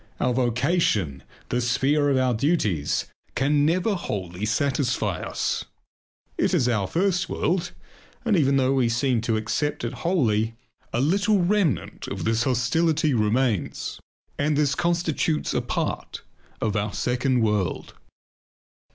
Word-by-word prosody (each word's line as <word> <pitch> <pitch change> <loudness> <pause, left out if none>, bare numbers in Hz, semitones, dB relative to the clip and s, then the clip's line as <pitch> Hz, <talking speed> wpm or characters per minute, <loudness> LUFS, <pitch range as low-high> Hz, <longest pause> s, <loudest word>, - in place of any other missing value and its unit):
Our 125 - +1
vocation, 120 - +1 0.3
the 125 - 0
sphere 135 +4 +2
of 135 - +2
our 130 -1 +2
duties, 110 - 0 0.3
can 145 +2 +2
never 185 +6 +1
wholly 95 - -4
satisfy 120 - 0
us. - - -2 0.7
It - - +2
is 125 - +2
our 105 -6 +1
first 180 - 0
world; 175 +1 0 0.6
and 225 -3 +3
even 140 -5 +3
though 130 0 +2
we 130 -3 +2
seem 120 0 +1
to 115 -1 0
accept 120 +7 -2
it 120 - -2
wholly, 115 - +1 0.4
a 120 - -1
little 200 +8 +3
remnant 185 -4 0
of - - -4
this 115 +1 +1
hostility 150 +5 +2
remains 110 -1 0 0.4
and 145 0 +1
this 145 -2 +2
constitutes 170 -1 0
a - - +1
part - - -3 0.4
of 110 -1 0
our 105 0 -1
second 125 0 +1
world. 105 -5 -1
130 Hz, 135 wpm, -24 LUFS, 115-155 Hz, 0.7 s, and